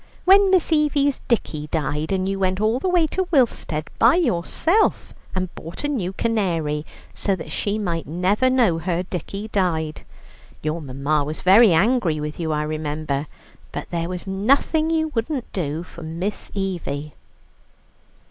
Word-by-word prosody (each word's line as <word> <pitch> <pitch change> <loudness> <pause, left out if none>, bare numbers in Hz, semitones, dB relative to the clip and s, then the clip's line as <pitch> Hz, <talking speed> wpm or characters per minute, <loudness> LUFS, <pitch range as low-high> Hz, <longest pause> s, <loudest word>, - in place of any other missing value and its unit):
When 390 +1 +7
Miss 365 -3 +3
Evie's 290 -2 +2
dickie 155 -10 -1
died, 150 +1 -2 0.2
you 195 0 -2
went 185 0 +1
all 220 +4 +2
the 370 - -1
way 350 -2 +4
to 375 +4 -2
Willstead 225 - +1
by - - +6
yourself 330 - +1 0.2
and 185 -1 -2
bought 165 - -9
a - - +1
new 220 -11 -1
canary, 170 -9 -1 0.3
so 195 - 0
that 165 - -8
she 205 +1 -1
might 170 -6 -2
never 185 +10 +2
know 235 -11 +3
her 175 +1 -1
dickie 195 +4 -5
died. 165 -6 -1 0.6
Your 155 +2 -2
mamma 140 +2 0
was 150 +2 -5
very 200 +3 +7
angry 185 -2 +2
with 150 +2 -5
you, 160 -2 -1
I 150 0 0
remember; 150 -1 -3 0.4
but - - -6
there 170 0 -2
was 180 -1 -5
nothing 275 +11 +2
you 320 -1 +1
wouldn't 255 0 -3
do 160 -3 -2
for 170 - -12
Miss 170 +6 -4
Evie." 160 -7 -3
185 Hz, 155 wpm, -22 LUFS, 155-240 Hz, 0.6 s, When